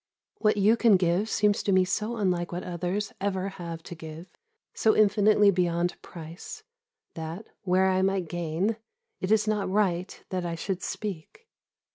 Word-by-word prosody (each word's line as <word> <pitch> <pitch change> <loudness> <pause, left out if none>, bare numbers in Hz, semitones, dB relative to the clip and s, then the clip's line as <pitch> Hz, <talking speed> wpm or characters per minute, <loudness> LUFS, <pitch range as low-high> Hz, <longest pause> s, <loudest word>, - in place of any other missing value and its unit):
What 210 -1 +2
you 210 +3 +4
can 230 -4 +5
give 180 +4 +1
seems 210 -1 +2
to 200 - 0
me 185 -1 +4
so 215 +5 -2
unlike 180 -4 0
what 175 +1 -4
others 180 +4 -3
ever 195 -1 -1
have 170 -4 -7
to - - -8
give, 160 0 -9 0.5
so 220 - +3
infinitely 210 -1 +5
beyond 175 -1 0
price, 165 +1 -9 0.5
that, 165 +6 -6 0.2
where 185 +1 +3
I 190 0 +2
might 190 -2 +1
gain, 175 +6 -1 0.4
it 185 - -2
is 220 0 +3
not 205 -3 0
right 185 -2 0
that 185 -2 -2
I 170 -1 -3
should 185 +2 -3
speak. 210 - -6
185 Hz, 160 wpm, -27 LUFS, 175-210 Hz, 0.5 s, can